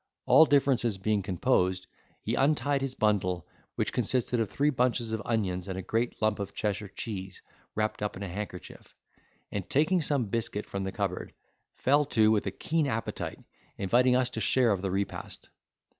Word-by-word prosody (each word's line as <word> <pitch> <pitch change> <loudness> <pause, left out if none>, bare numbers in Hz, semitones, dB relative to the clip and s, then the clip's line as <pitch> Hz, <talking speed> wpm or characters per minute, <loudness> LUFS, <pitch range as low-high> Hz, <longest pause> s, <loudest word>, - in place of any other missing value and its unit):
All 160 - +8
differences 130 -7 +2
being 105 +1 0
composed, 90 0 +1 0.4
he - - -1
untied 145 0 +2
his 135 -1 -3
bundle, 90 -6 +1 0.3
which - - -1
consisted 125 +1 +1
of 110 -3 0
three 145 +2 +1
bunches 120 -3 0
of 110 -1 -2
onions, 95 -5 -1
and 95 -1 -4
a 95 - -4
great 115 +5 -1
lump 110 -1 +2
of 100 0 -5
Cheshire 105 0 -2
cheese, 95 -1 -6 0.3
wrapped 110 0 -1
up 105 -2 -2
in 100 - -6
a - - -4
handkerchief: 95 0 -8 0.6
and, 100 -3 -4
taking 160 +6 +3
some 140 -5 0
biscuit 105 0 -2
from 100 -1 -4
the 95 - -3
cupboard, 95 -3 -3 0.4
fell 145 +3 +3
to 110 -5 +3
with 105 -2 +1
a - - 0
keen 160 - 0
appetite, 115 -3 -3 0.4
inviting 125 +6 +3
us 130 0 +2
to 110 - -4
share 125 -1 +3
of 95 -2 0
the 95 - -1
repast. 100 +2 -4
110 Hz, 175 wpm, -29 LUFS, 95-125 Hz, 0.6 s, All